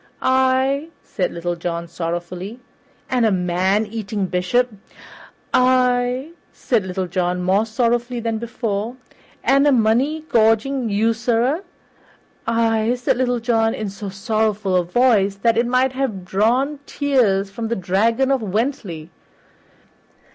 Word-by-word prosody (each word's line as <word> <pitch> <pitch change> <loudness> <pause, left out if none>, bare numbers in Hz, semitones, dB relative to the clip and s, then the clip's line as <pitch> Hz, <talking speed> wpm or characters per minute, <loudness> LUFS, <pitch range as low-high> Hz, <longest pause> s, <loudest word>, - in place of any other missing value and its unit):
"Ay," 260 +3 +2 0.2
said 185 - -2
Little 175 +1 -3
John 170 0 -4
sorrowfully. 175 +6 -5 0.5
"And 250 -2 +1
a 220 - +3
man 185 +3 +1
eating 210 -2 -3
bishop?" 200 +7 0 0.8
"Ay," 250 +2 +2 0.2
said 235 -6 0
Little 185 0 -2
John, 180 0 -1
more 195 +4 +2
sorrowfully 240 +1 0
than 225 -1 -2
before. 230 -1 -3 0.5
"And 275 +2 +4
a - - +5
money 255 +6 +2
gorging 225 +2 +2
usurer?" 230 - +1 0.8
"Ay," 230 0 +1
said 245 - 0
Little 245 -1 +1
John 225 -1 +1
in 215 -2 -4
so 200 0 -7
sorrowful 210 -1 -1
a 180 - +3
voice 200 0 +2
that 230 +3 +1
it 235 +1 +2
might 255 +1 +2
have 245 -9 -3
drawn 245 +10 +1
tears 220 -9 +1
from 225 +3 -4
the 235 - -1
Dragon 225 +8 +1
of 270 -3 +1
Wentley. 205 - -3
225 Hz, 125 wpm, -20 LUFS, 195-250 Hz, 0.8 s, a